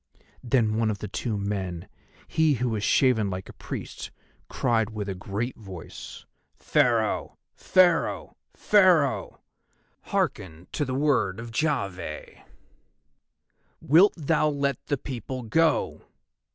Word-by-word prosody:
Then 115 -4 +1
one 115 -1 +1
of 105 - -2
the 105 - -6
two 105 +2 -3
men, 95 -4 -3 0.4
he 160 -2 +2
who 125 +1 -1
was 110 -2 -2
shaven 110 -6 +3
like 95 0 -5
a - - -10
priest, - - -7 0.4
cried 115 -4 +1
with 105 -2 -5
a 95 - -2
great 105 +6 -4
voice: 95 -6 -10 0.3
"Pharaoh! - - +1 0.2
Pharaoh! 180 -3 +2 0.2
Pharaoh! 180 -9 +3 0.6
Hearken 80 -1 -2
to 145 - -1
the 130 -1 -3
word 130 -9 +1
of 115 0 -7
Jahveh. 100 - -3 1.4
Wilt 175 +8 +5
thou 155 0 +1
let 140 -3 -1
the 145 - 0
people 130 0 -6
go?" 160 +8 +1
120 Hz, 120 wpm, -26 LUFS, 100-145 Hz, 1.4 s, Wilt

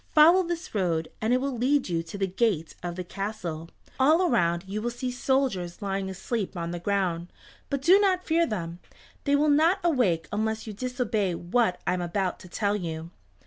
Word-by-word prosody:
Follow 330 +5 +8
this 345 0 -4
road, 170 -6 0
and 220 +2 +1
it 250 - +4
will 275 0 -2
lead 260 +4 +2
you 170 -2 0
to 165 +4 -8
the 195 - +1
gate 190 -4 0
of 175 -1 -4
the 185 - -4
castle. 180 -4 -5 0.3
All 310 +7 +5
around 175 - +2
you 205 +2 -3
will 240 - -1
see 250 +1 -4
soldiers 250 -9 0
lying 195 -2 -2
asleep 190 +1 -3
on 170 0 -3
the 175 - -4
ground, 180 -3 -1 0.4
but 280 -1 -2
do 370 +6 +7
not 375 -3 +2
fear 335 +1 +2
them. 170 -5 -4 0.5
They 285 -1 +3
will 295 +1 +3
not 320 +6 +4
awake 215 - +2
unless 220 +1 -1
you 215 - -6
disobey 220 -5 -1
what 180 +2 +1
I - - +2
am 180 - -1
about 180 +2 -1
to 185 - -13
tell 205 +2 0
you." 165 -3 -5
210 Hz, 195 wpm, -27 LUFS, 175-265 Hz, 0.5 s, Follow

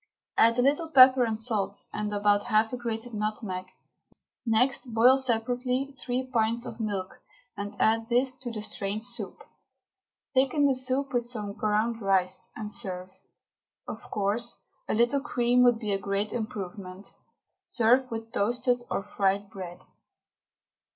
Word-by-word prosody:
Add 230 +1 +4
a 245 - +3
little 295 +4 +2
pepper 260 -3 +8
and 220 -1 -2
salt, 220 -3 -2
and 210 0 -3
about 205 0 +2
half 220 0 +2
a - - -1
grated 235 0 -4
nutmeg. 210 -3 -3 0.8
Next 235 +1 +1
boil 245 +4 +7
separately 250 +2 0
three 255 -1 -3
pints 235 -1 0
of - - -8
milk, 200 -4 -4 0.3
and 205 0 -5
add 225 +1 +2
this 250 +2 +3
to 255 -1 -6
the 215 -2 -5
strained 210 0 -4
soup. 245 - -5 0.9
Thicken 275 +2 +3
the 275 - +4
soup 260 +1 -1
with 240 -1 0
some 210 -4 -4
ground 215 +2 0
rice, 190 -2 +1
and 210 -1 -5
serve. 185 -2 -3 0.8
Of - - -6
course, 210 +4 -1 0.3
a - - +1
little 240 +5 +3
cream 245 -3 +2
would 240 -2 +5
be 215 -3 -3
a 195 - 0
great 200 +1 -2
improvement. 195 -3 -6 0.5
Serve 250 +3 +2
with 225 0 -6
toasted 245 +4 +1
or - - -2
fried 200 0 -1
bread. 180 -3 -8
225 Hz, 145 wpm, -28 LUFS, 205-250 Hz, 0.9 s, pepper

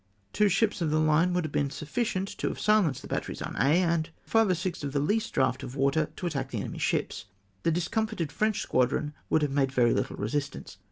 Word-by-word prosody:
Two 210 -1 +3
ships 205 0 +1
of 165 - +1
the 155 +1 +2
line 155 +3 +3
would 180 -2 0
have 155 - -5
been 140 -1 0
sufficient 185 - -2
to - - 0
have - - -3
silenced 210 - +2
the - - -8
batteries - - -3
on - - -5
Aix, 150 +7 +4
and 165 -1 0 0.2
five 225 -2 +3
or 185 - +3
six 180 -2 -4
of 140 -1 -3
the 145 - +1
least 210 +10 0
draught 130 0 +1
of 130 -1 -7
water 140 +3 +1
to - - -6
attack 135 -6 -2
the 120 - -4
enemy's - - -5
ships. - - -1 0.4
The - - +1
discomfited 175 0 -1
French 215 +5 0
squadron 145 +4 +1 0.2
would 160 - +3
have 145 - 0
made 135 -1 +1
very 120 -3 +3
little - - -1
resistance. 135 +7 -4
155 Hz, 225 wpm, -28 LUFS, 140-185 Hz, 0.4 s, Aix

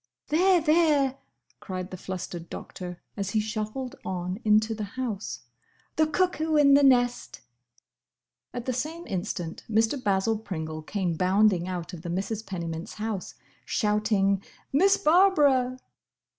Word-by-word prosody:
"There, 360 +4 +4
there!" 305 -4 +3 0.4
cried 185 -1 -6
the - - -5
flustered 180 -2 -6
Doctor, 180 -1 -7 0.2
as 200 -2 -3
he 215 - +1
shuffled 215 +4 -3
on 180 +1 -3
into 215 +1 +3
the 215 -1 -4
house, 210 - -3 0.5
"the 315 0 +3
cuckoo 320 -1 +1
in 285 -2 +6
the 285 - +7
nest!" 245 -3 +2 1.1
At 245 -1 -6
the 255 - -1
same 320 +7 -4
instant 175 -3 -4
Mr. 225 +5 +1
Basil 205 +2 +1
Pringle 160 -6 -5
came 180 +1 -2
bounding 185 +1 +3
out 180 -1 -5
of 170 - -7
the 170 - -6
Misses 195 +5 -2
Pennymint's 170 -5 -5
house, 215 -3 -4 0.3
shouting, 210 -2 +1 0.3
"Miss 385 +8 +5
Barbara!" 295 -7 +4
215 Hz, 130 wpm, -27 LUFS, 185-275 Hz, 1.1 s, the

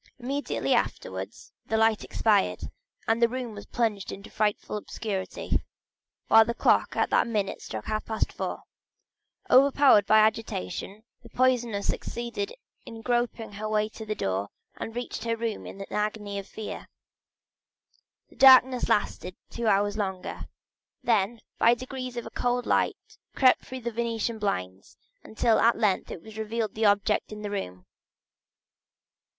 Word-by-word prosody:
Immediately 275 +3 -1
afterwards - - -3
the 220 - +1
light 225 -1 +3
expired, 200 - +1 0.4
and 225 +1 +2
the 235 - +5
room 250 -2 -4
was 205 -1 -10
plunged 215 -5 -1
in 200 - -8
frightful 210 0 -1
obscurity, 205 -2 -3 0.6
while 225 0 +8
the 235 +1 -3
clock - - +2
at - - +1
that - - +3
minute 210 -4 -2
struck 110 -1 -6
half 215 0 -2
past 220 -1 -1
four. - - -4 0.9
Overpowered 270 -5 +6
with - - -26
agitation, 215 - +1 0.2
the - - -15
poisoner 240 -5 +1
succeeded 235 -3 -3 0.3
in 225 -1 -10
groping 240 -2 -1
her 210 +1 -5
way 215 0 +1
to 220 - -9
the 215 0 -3
door, 95 - -2 0.3
and 225 - -6
reached 245 -2 -4
her 230 0 0
room 225 -2 -3
in - - -9
an 195 - -8
agony 210 -1 -2
of 195 - -9
fear. 220 - -7 1.4
The - - -20
darkness 260 -1 +7
lasted 185 -3 0 0.2
two 235 -1 -3
hours 205 0 +2
longer; 190 -3 -4 0.6
then 225 -1 +1 0.2
by 235 +1 +5
degrees 255 0 -6
a 235 - -4
cold 245 0 -1
light - - +2 0.4
crept 255 -2 +5
through 260 0 -6
the 235 0 -3
Venetian 230 0 -2
blinds, 95 - -3 0.3
until 220 +1 +2
at 230 0 +4
length 210 -4 +1
it 210 +5 -9
revealed 220 0 -2
the 220 0 0
objects 205 +1 +2
in 210 0 -7
the 205 - -4
room. 90 - -5
220 Hz, 145 wpm, -27 LUFS, 205-235 Hz, 1.4 s, while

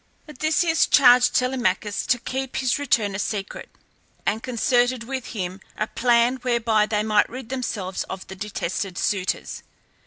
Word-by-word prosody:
Odysseus 315 +3 +1
charged 250 -3 +6
Telemachus 240 -5 0
to 245 - +3
keep 260 +2 -5
his 260 0 0
return 230 -8 +1
a 195 - -4
secret, 205 -1 -4 0.6
and 220 - 0
concerted 245 0 +1
with 260 +1 -5
him 190 -3 -5 0.2
a 215 - 0
plan 240 +2 +2
whereby 235 -4 +1
they 210 -1 0
might 215 -1 +2
rid 255 -2 -8
themselves 215 -8 -3
of 190 0 -7
the 190 - -9
detested 195 -2 -4
suitors. 190 -3 -2
235 Hz, 145 wpm, -23 LUFS, 205-255 Hz, 0.6 s, charged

